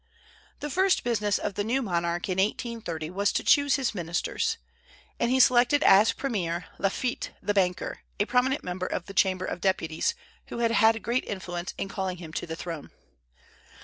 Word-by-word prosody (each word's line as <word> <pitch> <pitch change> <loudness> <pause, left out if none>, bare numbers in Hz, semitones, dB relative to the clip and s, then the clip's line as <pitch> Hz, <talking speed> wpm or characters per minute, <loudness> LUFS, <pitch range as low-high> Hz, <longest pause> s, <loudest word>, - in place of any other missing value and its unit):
The 295 - -4
first 375 +3 +2
business 210 -4 +1
of 205 - -3
the 205 - -1
new 255 +5 0
monarch 170 -3 -1
in 185 -1 -1
1830 195 -6 -2
was 200 +2 +1
to - - 0
choose 285 -2 +4
his 270 -5 0
ministers, 170 -3 -1 0.6
and 235 - +1
he 260 +1 +3
selected 255 +3 +5
as 205 +3 +7
premier 180 -10 -2
Lafitte 240 +5 -1
the 205 - -1
banker, 180 -3 0 0.2
a 205 - +3
prominent 255 +4 +1
member 180 +1 -3
of 175 - -3
the 195 - -9
Chamber 185 -1 +2
of 180 - -4
Deputies, 185 - 0 0.3
who - - -6
had 230 -1 +2
had 225 -1 +4
great 240 +2 0
influence 175 -2 -5
in - - -3
calling 190 -2 -3
him 165 -3 -10
to - - -4
the 160 - -4
throne. 165 -3 -6
200 Hz, 180 wpm, -27 LUFS, 180-240 Hz, 0.6 s, as